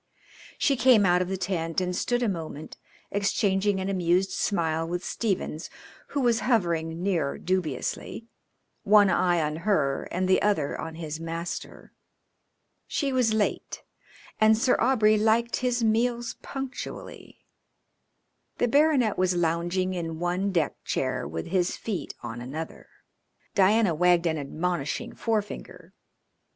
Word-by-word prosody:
She 280 - +2
came 245 -5 +5
out 180 0 +4
of 180 - -1
the 190 +1 -2
tent 165 -3 -1
and 180 -1 -2
stood 245 +6 0
a - - +2
moment 160 -5 -5 0.4
exchanging 200 0 +1
an 190 - -2
amused 185 0 +1
smile 165 -5 0
with 175 +1 -3
Stephens, 190 -7 -2 0.4
who 285 - -2
was 240 -2 +3
hovering 170 -8 0
near 170 -8 0
dubiously, 185 - -3 0.6
one 205 -1 +5
eye 175 -2 +2
on 150 +1 -2
her 160 -7 0
and 185 +1 -1
the 185 - +3
other 195 -9 +1
on 160 - -6
his 160 -1 -5
master. 165 +1 -6 0.9
She 275 -2 -1
was 250 -4 +2
late, 210 -2 -2 0.6
and 215 0 +5
Sir 250 +2 +3
Aubrey 215 -4 +4
liked 225 +2 +2
his 245 -1 0
meals 235 +2 +1
punctually. 270 -1 -7 1.1
The 245 - +2
baronet 275 -6 +3
was 185 -1 +2
lounging 175 +2 0
in 165 -3 -4
one 180 +4 -1
deck 165 -6 -1
chair - - -2
with 80 +2 -5
his 180 0 0
feet 190 -9 -4
on 120 0 -6
another. 150 +6 -7 0.7
Diana 200 -1 +4
wagged 175 +1 +3
an 160 -2 0
admonishing 165 +7 -3
forefinger. 215 -3 -4
185 Hz, 135 wpm, -26 LUFS, 165-220 Hz, 1.1 s, came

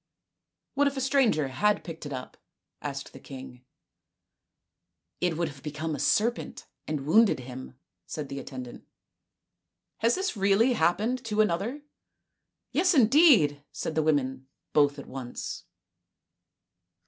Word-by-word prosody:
" - - -60
What 285 +1 +3
if 280 0 -2
a - - 0
stranger 255 - +2
had 210 +9 +1
picked 165 -3 -7
it - - -8
up? 130 -2 -6 0.2
" - - -57
asked 140 0 -8
the - - -11
king. 130 -2 -10 0.7
" - - -56
It 175 -3 +1
would 170 -1 0
have 140 -3 -10
become 155 +2 -4
a 145 - -4
serpent, 220 - 0 0.2
and 150 -3 -3
wounded 205 - +4
him," 130 +1 -9 0.3
said 150 -2 -5
the 140 0 -5
attendant. 130 -3 -8 0.6
" - - -58
Has 230 +2 +3
this 380 -7 -2
really 200 +5 +3
happened 220 +8 +1
to 215 -1 -2
another? 215 - -1 0.3
" - - -55
" - - -57
Yes, 365 0 +3
indeed," 230 - +5
said - - -4
the 160 - +2
women, 135 -4 0 0.3
both 145 -1 +4
at 140 - -8
once. 130 -2 -6
160 Hz, 150 wpm, -28 LUFS, 140-230 Hz, 0.7 s, indeed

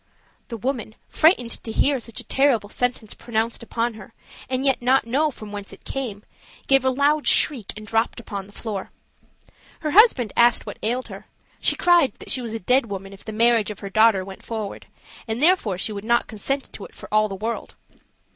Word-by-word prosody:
The 230 - -6
woman, 235 -2 -3
frightened 310 -8 +3
to 225 - -5
hear 275 +4 +2
such 230 -1 -7
a - - -8
terrible 260 -7 +2
sentence 245 -2 -2
pronounced 230 0 -2
upon 235 0 -2
her, 220 +2 -13 0.3
and 260 +1 -1
yet 270 -2 +2
not 255 +1 +3
know 280 +7 +1
from 215 -6 -10
whence 205 -1 -7
it 195 - -14
came, 230 -7 -4 0.4
gave 270 -1 +4
a 260 - +3
loud 285 +3 +2
shriek 240 -9 +4
and 215 - -9
dropped 225 +3 0
upon 200 -4 -6
the - - -16
floor. 205 -2 -5 0.9
Her 305 - -2
husband 335 - +5
asked 235 0 +4
what - - -8
ailed 245 +4 -2
her: - - -10 0.3
she - - +2
cried 345 -9 +4
that - - -7
she 255 - 0
was 225 -2 -5
a - - -3
dead 250 +5 +2
woman 195 -1 -6
if 195 - -14
the 220 - -6
marriage 230 -1 +3
of 210 - -8
her 200 -1 -6
daughter 215 -3 +4
went 190 0 -10
forward, 220 -3 -6 0.4
and 225 +1 -2
therefore 300 - +3
she 205 - -1
would 200 -1 -6
not 235 +1 +2
consent 270 +6 -3
to 200 - -8
it - - -12
for - - -11
all 215 0 +3
the 195 - -5
world. 225 +4 -4
230 Hz, 205 wpm, -23 LUFS, 215-260 Hz, 0.9 s, husband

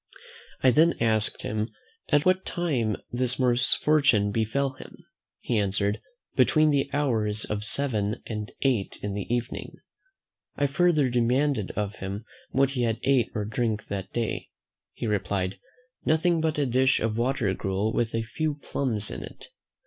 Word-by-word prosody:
I 130 - +7
then 160 +6 +4
asked 110 -2 +2
him, 110 +1 -2 0.4
"at 145 -1 +3
what 185 +1 +3
time 130 -12 0 0.2
this 125 +1 +1
misfortune 125 -2 +3
befell 115 +6 0
him?" 130 - -13 0.4
He 115 -3 0
answered, 100 +1 0 0.3
"Between 155 -1 +4
the 140 -1 +1
hours 110 -7 +1
of 105 0 -3
seven 110 -3 0
and 105 -1 -5
eight 125 -8 0
in 100 -1 -2
the 100 +2 -4
evening." 120 0 -3 0.8
I 145 - +1
further 150 0 +3
demanded 125 -1 +1
of 105 -1 -3
him 100 +3 -5 0.2
what 135 0 +2
he 130 -3 -2
had 115 -1 0
ate 130 -4 +3
or 105 -2 -1
drank 110 0 -2
that 95 -1 -4
day? 115 -2 -2 0.4
He - - -5
replied, 95 -2 -1 0.4
"Nothing 165 +1 +2
but 160 -1 0
a 145 - +2
dish 130 +1 +3
of 110 -1 -1
water 120 -4 0
gruel 95 +4 -1
with 115 -1 0
a 115 - 0
few 150 +6 -2
plums 120 -7 -1
in - - -5
it." - - -10
120 Hz, 155 wpm, -26 LUFS, 105-140 Hz, 0.8 s, I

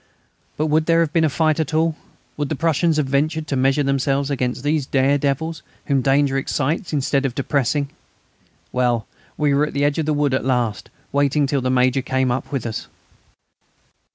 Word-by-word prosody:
But 155 - 0
would 155 +1 +1
there 165 0 +4
have 160 -2 -1
been 165 -2 +3
a 155 - +3
fight 155 +1 +1
at 155 0 -1
all? 160 0 +2 0.4
Would 145 -1 -3
the 155 - -1
Prussians 165 +1 +1
have 150 - +2
ventured 150 +4 0
to 145 - -2
measure 135 +2 +2
themselves 140 +1 0
against 125 -2 -2
these 145 -2 0
dare 140 +1 +2
devils, 155 +3 -2 0.2
whom 140 -2 +1
danger 135 0 +2
excites 150 +7 -2
instead 140 -1 0
of 130 -3 -2
depressing? 140 0 0 0.8
Well, 120 -2 +1 0.3
we 150 -2 +2
were 145 +2 +2
at - - -8
the 140 - 0
edge 145 +2 +1
of 155 - -1
the 155 - +2
wood 145 -2 +1
at 130 - 0
last, 120 -5 -1 0.2
waiting 140 +1 +2
till 140 0 0
the 130 - -1
Major 130 +1 +2
came 130 0 0
up 125 - -3
with 135 -5 -2
us. 110 -2 -4
140 Hz, 195 wpm, -21 LUFS, 130-155 Hz, 0.8 s, there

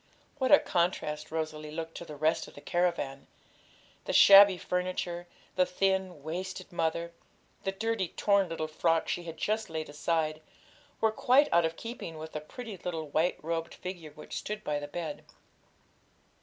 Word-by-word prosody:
What 260 -1 +1
a 290 - +11
contrast 155 - -1
Rosalie 155 -1 -3
looked 165 +1 -5
to 170 - -7
the 150 - -8
rest 155 +2 +1
of - - -15
the - - -9
caravan! 170 -6 -1 0.8
The - - -2
shabby 200 -1 +9
furniture, 180 -1 -2 0.3
the 180 - +3
thin, 190 -4 0
wasted 185 +4 -5
mother, 170 0 -1 0.5
the 195 - +1
dirty, 215 -1 -1
torn 200 +1 +2
little 160 -1 -3
frock 165 +1 +1
she 175 - -2
had 165 -1 -7
just 215 +1 -1
laid 160 -1 -4
aside, 155 +1 -1 0.6
were 220 - +4
quite 255 +6 +4
out 170 0 +5
of 160 0 -2
keeping 225 -8 -7
with 160 +1 -7
the 150 - -4
pretty 220 +6 -8
little 165 -3 -4
white 160 +5 +1
robed 165 0 -3
figure 180 -4 -7
which 150 - -9
stood 210 0 -4
by 150 -1 -1
the 145 - -6
bed. 155 0 -5
170 Hz, 165 wpm, -30 LUFS, 155-190 Hz, 0.8 s, a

